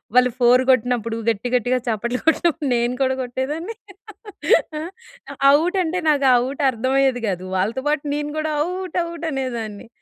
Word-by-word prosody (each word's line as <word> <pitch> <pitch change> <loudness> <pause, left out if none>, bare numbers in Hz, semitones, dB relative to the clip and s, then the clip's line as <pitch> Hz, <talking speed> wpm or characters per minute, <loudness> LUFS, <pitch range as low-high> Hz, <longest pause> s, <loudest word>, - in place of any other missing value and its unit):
వాళ్ళు 250 -1 +5
ఫోర్ 250 +1 +5
కొట్టినప్పుడు 240 -2 +1
గట్టి, 225 +2 -1
గట్టిగా 250 +2 +1
చప్పట్లు 235 +2 -1
కొట్టినప్పుడు 320 -2 +2
నేను 240 +1 0
కూడా 260 -1 +2
కొట్టేదాన్ని. 295 - -4 1.1
ఆహ్, 335 +3 -6 0.7
ఔట్ 355 +5 -1
అంటే 350 +2 -2
నాకు 280 -2 +3 0.2
ఔట్ 275 +2 -5
అర్థం 255 +2 -2
అయ్యేది 260 -3 +1
కాదు. 185 -1 -3
వాళ్ళతో 220 +8 -1
పాటు 300 -1 0
నేను 295 0 -3
కూడా 310 0 -2 0.2
ఔట్, 365 -1 -5
ఔట్ 335 0 -7
అనేదాన్ని. 235 -5 -4
260 Hz, 150 wpm, -21 LUFS, 240-305 Hz, 1.1 s, వాళ్ళు